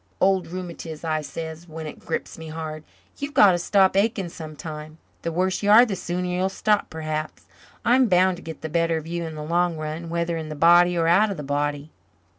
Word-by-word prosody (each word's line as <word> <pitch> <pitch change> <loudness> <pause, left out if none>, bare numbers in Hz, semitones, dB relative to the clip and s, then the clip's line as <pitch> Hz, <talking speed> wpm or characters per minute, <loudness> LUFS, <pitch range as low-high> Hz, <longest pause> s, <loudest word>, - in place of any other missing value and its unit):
'Old 190 -1 +2
rheumatiz,' 170 -3 -7
I 155 -1 0
says, 160 +3 -7
when 160 0 -7
it 150 - -8
grips - - -4
me 160 0 -9
hard, 155 -1 -6 0.4
'you've 285 +1 -5
got 200 - +8
to 175 - 0
stop 190 +2 +3
aching 200 -2 +1
sometime. 155 -1 -8 0.2
The 165 - -3
worse 185 +3 0
you 205 - 0
are 225 +4 +9
the 210 -5 -3
sooner 180 0 -3
you'll 180 +1 0
stop, 210 +1 +1
perhaps. 155 -1 -5 0.4
I'm 250 +1 +5
bound 185 -1 +3
to - - -11
get 160 -1 -8
the 160 - -4
better 165 +1 +1
of 155 - -6
you 170 0 -3
in 160 - -7
the 150 - -6
long 170 +1 +1
run, 155 +2 -5
whether 170 0 -1
in 160 -1 -5
the 155 - -5
body 175 +3 +5
or 165 -1 +2
out 195 +6 +4
of 195 - -4
the 150 - -5
body.'" 145 +1 -2
170 Hz, 220 wpm, -24 LUFS, 155-185 Hz, 0.4 s, are